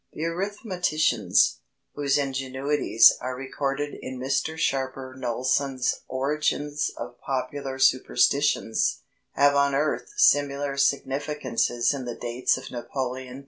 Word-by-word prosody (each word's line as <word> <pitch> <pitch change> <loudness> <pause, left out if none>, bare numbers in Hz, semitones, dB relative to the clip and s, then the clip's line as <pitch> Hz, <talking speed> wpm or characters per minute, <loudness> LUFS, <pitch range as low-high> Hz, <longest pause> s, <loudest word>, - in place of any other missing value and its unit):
The 155 - -5
arithmeticians, 170 - +1 0.4
whose 145 -1 +1
ingenuities 135 -2 +3
are 130 0 -3
recorded 135 +2 -3
in 130 -1 -6
Mr 135 +5 -1
Sharper 130 -3 -2
Knowlson's 130 +1 -1
Origins 145 +1 -1
of 120 +1 -8
Popular 135 0 -4
Superstitions, 135 -1 +2 0.3
have 145 0 +4
unearthed 140 - +1
similar 145 - +3
significances 140 -3 0
in 135 -3 -5
the 120 - -5
dates 120 +1 0
of - - -9
Napoleon 125 +1 -5
III. - - -8
135 Hz, 105 wpm, -25 LUFS, 130-145 Hz, 0.4 s, have